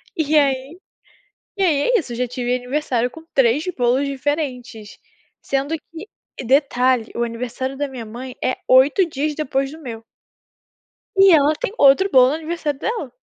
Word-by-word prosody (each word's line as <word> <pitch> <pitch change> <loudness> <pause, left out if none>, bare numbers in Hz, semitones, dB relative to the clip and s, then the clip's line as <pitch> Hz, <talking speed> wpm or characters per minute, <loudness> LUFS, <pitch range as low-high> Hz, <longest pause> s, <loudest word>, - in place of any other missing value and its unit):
E 310 -1 +1
aí 275 +3 0 0.8
e 390 - -1
aí 310 -6 +2
é - - +5
isso, 265 -8 -5
eu - - -5
já 250 0 -1
tive 245 0 -2
aniversário 250 -1 -1
com 320 +5 -13
3 270 +3 +2
bolos 255 +2 +1
diferentes. 260 -6 -4 0.4
Sendo 275 +3 -2
que 330 +6 -12 0.3
e - - -5
detalhe, 255 -2 +2
o 235 - -1
aniversário 250 +3 -5
da 290 - -2
minha 255 -4 -8
mãe 245 +4 -9
é 255 - 0
8 280 +8 +5
dias 300 0 -2
depois 270 -2 -2
do 315 - -11
meu. 230 -6 -8 1.1
E 385 -1 +6
ela 300 0 +4
tem - - -3
outro 285 +9 +5
bolo 255 -3 +6
no 290 - -1
aniversário 315 -3 -4
dela. 455 0 -4
270 Hz, 165 wpm, -20 LUFS, 250-305 Hz, 1.1 s, E